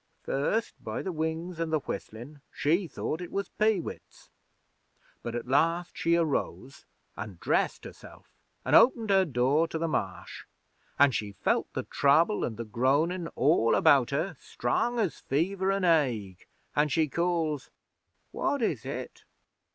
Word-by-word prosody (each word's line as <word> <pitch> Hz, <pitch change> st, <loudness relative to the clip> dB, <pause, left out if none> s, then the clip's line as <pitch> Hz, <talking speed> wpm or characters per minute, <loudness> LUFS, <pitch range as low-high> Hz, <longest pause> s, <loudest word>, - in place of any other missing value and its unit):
'First, 180 Hz, +12 st, -2 dB
by -, -, -4 dB
the 190 Hz, -, -3 dB
wings 160 Hz, +2 st, -3 dB
an' 165 Hz, -1 st, -1 dB
the 155 Hz, -, +2 dB
whistlin', 125 Hz, +6 st, -7 dB
she 170 Hz, +5 st, +1 dB
thought 160 Hz, +1 st, -4 dB
it 175 Hz, -, -7 dB
was 200 Hz, 0 st, -3 dB
peewits, 215 Hz, -5 st, -2 dB, 0.9 s
but 120 Hz, 0 st, -4 dB
last 165 Hz, +7 st, +1 dB
she 170 Hz, 0 st, +2 dB
arose 145 Hz, -4 st, -2 dB, 0.3 s
an' 100 Hz, -3 st, -7 dB
dressed -, -, 0 dB
herself, -, -, -13 dB, 0.3 s
an' -, -, -1 dB
opened 230 Hz, -4 st, +5 dB
her 190 Hz, -1 st, +5 dB
door 140 Hz, +3 st, +2 dB
to 160 Hz, -, -4 dB
the 165 Hz, +1 st, -1 dB
Marsh, 95 Hz, -, -4 dB, 0.5 s
an' 140 Hz, -1 st, +6 dB
she 105 Hz, -4 st, -3 dB
felt 100 Hz, -, -1 dB
the -, -, -3 dB
Trouble 155 Hz, +9 st, +3 dB
an' 110 Hz, -, -2 dB
the 115 Hz, +1 st, -6 dB
Groanin' 145 Hz, -, +1 dB
all 135 Hz, -4 st, +3 dB
about 135 Hz, -4 st, +5 dB
her, 160 Hz, +5 st, -2 dB
strong 235 Hz, -, -1 dB
as 200 Hz, -, -1 dB
fever 190 Hz, +7 st, 0 dB
an' 195 Hz, -1 st, -1 dB
ague, 120 Hz, -, +1 dB, 0.3 s
an' 150 Hz, +1 st, +3 dB
she 160 Hz, +1 st, +2 dB
calls: 165 Hz, -3 st, -1 dB, 0.6 s
"What 280 Hz, -4 st, -1 dB
is -, -, -1 dB
it? -, -, -6 dB
160 Hz, 145 wpm, -28 LUFS, 130-175 Hz, 0.9 s, an